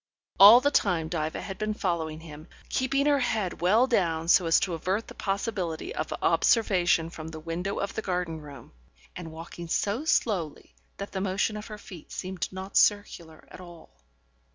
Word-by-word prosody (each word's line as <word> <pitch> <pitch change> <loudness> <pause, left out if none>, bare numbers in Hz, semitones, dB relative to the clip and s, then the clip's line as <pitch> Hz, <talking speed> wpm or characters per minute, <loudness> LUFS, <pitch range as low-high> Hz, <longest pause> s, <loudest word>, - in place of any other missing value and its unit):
All 215 +5 +10
the 285 - +2
time 175 - +1
Diva 160 -2 -3
had 195 - -7
been 215 0 -2
following 160 -5 -2
him, 155 0 -11 0.2
keeping 275 +2 0
her 290 -1 +3
head 215 -9 -2
well 210 +8 +4
down 170 -10 0
so 180 -1 +5
as 165 - +5
to 185 - -1
avert 185 +7 -2
the - - -10
possibility 195 - -3
of - - -4
observation 175 -7 +2
from 160 -2 -8
the 160 -1 -8
window 170 +5 -4
of 200 - -3
the - - -3
garden 180 -5 -3
room, 145 -2 -12 0.4
and 170 -3 -8
walking 165 +1 -9
so 205 - -1
slowly 180 - -1 0.2
that 200 - -7
the 190 - -3
motion 200 +3 -1
of 210 0 -7
her 215 - -8
feet 185 -6 -13
seemed 185 -2 -5
not 190 +1 -4
circular 170 -6 +1
at - - -11
all. 175 - -13
185 Hz, 175 wpm, -27 LUFS, 165-210 Hz, 0.4 s, All